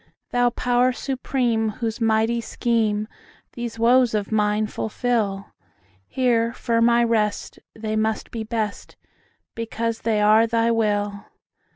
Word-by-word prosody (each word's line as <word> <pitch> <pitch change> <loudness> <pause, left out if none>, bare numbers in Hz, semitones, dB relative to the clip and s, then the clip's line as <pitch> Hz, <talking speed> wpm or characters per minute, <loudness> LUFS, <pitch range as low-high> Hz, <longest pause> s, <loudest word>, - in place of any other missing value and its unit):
Thou 245 0 +3
Power 245 +1 +1
Supreme, 245 -4 -1
whose 230 +1 -4
mighty 225 +1 +2
schemeThese 230 +1 -3
woes 240 0 +4
of 205 0 -2
mine 210 0 +1
fulfil, 215 -3 -2 0.6
Here 235 -3 +1
firm 230 -1 +2
I 235 0 +4
rest; 220 -3 -1 0.2
they 215 0 -3
must 220 0 -1
be 225 -1 -4
best, 220 -1 -4 0.6
Because 230 0 -3
they 220 -2 +1
are 215 +2 +5
Thy 230 0 +1
will! 205 -2 -1
225 Hz, 115 wpm, -23 LUFS, 215-235 Hz, 0.6 s, are